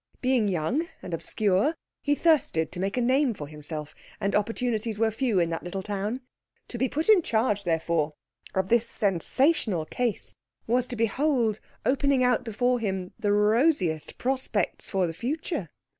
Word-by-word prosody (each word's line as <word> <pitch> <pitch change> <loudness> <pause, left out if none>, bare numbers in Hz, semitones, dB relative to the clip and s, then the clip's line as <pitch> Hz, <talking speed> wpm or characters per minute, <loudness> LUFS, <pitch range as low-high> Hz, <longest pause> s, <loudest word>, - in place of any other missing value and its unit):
Being 255 -4 +2
young 200 - 0 0.2
and 175 - -6
obscure, 205 - +1 0.3
he 290 0 +2
thirsted 280 - +2
to 180 - -7
make 195 +5 -1
a - - +2
name 260 0 +2
for 145 -6 -7
himself, 150 0 -6 0.3
and 200 - -1
opportunities 225 0 0
were 225 0 +2
few 225 -3 +1
in 170 -1 +1
that 165 - -2
little 190 +2 -5
town. 210 +5 -3 0.5
To 240 - -5
be 260 +1 +1
put 310 +3 -1
in 430 -4 +7
charge, 220 - 0
therefore, 160 -2 0 0.4
of 190 0 0
this 235 0 +3
sensational 200 - +1
case, 240 +4 -2 0.3
was 245 +2 +1
to 245 - -5
behold 230 -1 +1 0.3
opening 275 0 +3
out 250 -2 +3
before 245 +2 +1
him 190 -4 -3
the 205 - +1
rosiest 210 - +2
prospects 260 +1 -1
for 190 -2 +1
the 165 - -3
future. 275 - -3
220 Hz, 160 wpm, -27 LUFS, 185-255 Hz, 0.5 s, in